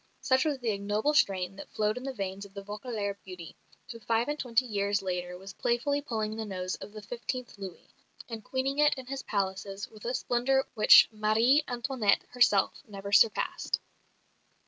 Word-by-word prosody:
Such 260 Hz, +2 st, +3 dB
was 300 Hz, -3 st, 0 dB
the 240 Hz, -3 st, -1 dB
ignoble 205 Hz, +7 st, 0 dB
strain 195 Hz, -, +2 dB
that -, -, -9 dB
flowed 215 Hz, 0 st, 0 dB
in 250 Hz, -, -5 dB
the 270 Hz, -, -3 dB
veins 195 Hz, -4 st, -5 dB
of 200 Hz, 0 st, -13 dB
the 200 Hz, -, -6 dB
Vaucouleurs 210 Hz, -1 st, -4 dB
beauty, 180 Hz, -3 st, -9 dB, 0.4 s
who 230 Hz, -, -9 dB
five 225 Hz, +2 st, 0 dB
and 295 Hz, 0 st, -2 dB
twenty 250 Hz, 0 st, +1 dB
years 200 Hz, -3 st, 0 dB
later 180 Hz, -1 st, -3 dB
was 195 Hz, +1 st, -10 dB
playfully 270 Hz, +7 st, 0 dB
pulling 220 Hz, -6 st, -3 dB
the 225 Hz, -, -3 dB
nose 185 Hz, -3 st, -4 dB
of -, -, -9 dB
the 215 Hz, 0 st, -10 dB
fifteenth 245 Hz, +3 st, -5 dB
Louis, 190 Hz, -3 st, -9 dB, 0.3 s
and 225 Hz, -2 st, -7 dB
queening 270 Hz, +4 st, -2 dB
it 300 Hz, 0 st, +5 dB
in 260 Hz, -2 st, -8 dB
his 270 Hz, +1 st, -5 dB
palaces 195 Hz, 0 st, -3 dB
with 215 Hz, 0 st, -14 dB
a 245 Hz, +2 st, -1 dB
splendour 265 Hz, +2 st, +1 dB
which 215 Hz, -, +8 dB
Marie 225 Hz, +7 st, +3 dB
Antoinette 240 Hz, -3 st, +1 dB
herself 240 Hz, -5 st, +3 dB
never 200 Hz, -1 st, -7 dB
surpassed. 215 Hz, +1 st, +3 dB
215 Hz, 180 wpm, -29 LUFS, 200-250 Hz, 0.4 s, which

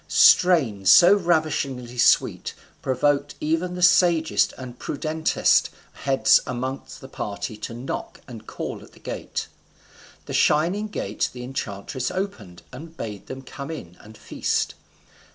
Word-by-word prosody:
Strains 130 Hz, -, +4 dB
so 175 Hz, +3 st, +8 dB
ravishingly 155 Hz, -9 st, -1 dB
sweet -, -, +2 dB, 0.3 s
provoked 145 Hz, +2 st, 0 dB
even 165 Hz, +4 st, -1 dB
the 180 Hz, -, -3 dB
sagest 170 Hz, -2 st, +4 dB
and 125 Hz, -1 st, -9 dB
prudentest 155 Hz, +2 st, +1 dB, 0.2 s
heads 135 Hz, -1 st, +3 dB
among 130 Hz, +2 st, -3 dB, 0.2 s
the 135 Hz, -, -9 dB
party 100 Hz, -3 st, -5 dB
to 110 Hz, +2 st, -7 dB
knock 125 Hz, +3 st, -6 dB
and 115 Hz, -3 st, -11 dB
call -, -, -6 dB
at -, -, -17 dB
the -, -, -18 dB
gate. -, -, -5 dB, 0.8 s
The -, -, -7 dB
shining 180 Hz, +8 st, +2 dB
gate 105 Hz, -, -3 dB
the 125 Hz, -1 st, -8 dB
enchantress 125 Hz, -1 st, -4 dB
opened, 125 Hz, -, -5 dB
and 160 Hz, +5 st, -11 dB
bade 105 Hz, -3 st, -7 dB
them 130 Hz, 0 st, -8 dB
come 140 Hz, +1 st, -8 dB
in 90 Hz, -, -8 dB
and 110 Hz, 0 st, -14 dB
feast. -, -, -2 dB
135 Hz, 135 wpm, -24 LUFS, 120-165 Hz, 0.8 s, so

